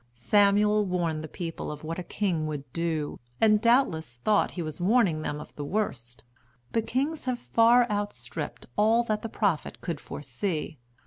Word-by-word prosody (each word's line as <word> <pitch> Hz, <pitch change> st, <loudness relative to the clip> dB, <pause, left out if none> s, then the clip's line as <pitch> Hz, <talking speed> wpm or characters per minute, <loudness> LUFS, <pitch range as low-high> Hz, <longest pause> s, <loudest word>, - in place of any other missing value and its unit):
Samuel 205 Hz, -, +4 dB
warned 170 Hz, -5 st, -1 dB
the -, -, -5 dB
people 165 Hz, 0 st, -5 dB
of 150 Hz, 0 st, -8 dB
what 165 Hz, +3 st, -4 dB
a -, -, -4 dB
king 175 Hz, -5 st, -1 dB
would 150 Hz, -3 st, -4 dB
do, 165 Hz, -3 st, -2 dB, 0.2 s
and 215 Hz, -1 st, +5 dB
doubtless 230 Hz, -, +2 dB
thought 205 Hz, -, +2 dB
he 175 Hz, -, -1 dB
was 155 Hz, +2 st, -6 dB
warning 190 Hz, -5 st, +3 dB
them 150 Hz, -1 st, -3 dB
of 150 Hz, -, -11 dB
the 145 Hz, -, -5 dB
worst, 140 Hz, -, -3 dB, 0.5 s
but 225 Hz, -1 st, 0 dB
kings 285 Hz, +5 st, -1 dB
have 255 Hz, -1 st, 0 dB
far 235 Hz, +1 st, +4 dB
outstripped 205 Hz, -2 st, -4 dB
all 220 Hz, +3 st, +4 dB
that 215 Hz, -2 st, -1 dB
the 225 Hz, -, -5 dB
prophet 200 Hz, -8 st, -1 dB
could 165 Hz, -4 st, -4 dB
foresee. 150 Hz, +2 st, -4 dB
185 Hz, 170 wpm, -27 LUFS, 155-215 Hz, 0.5 s, and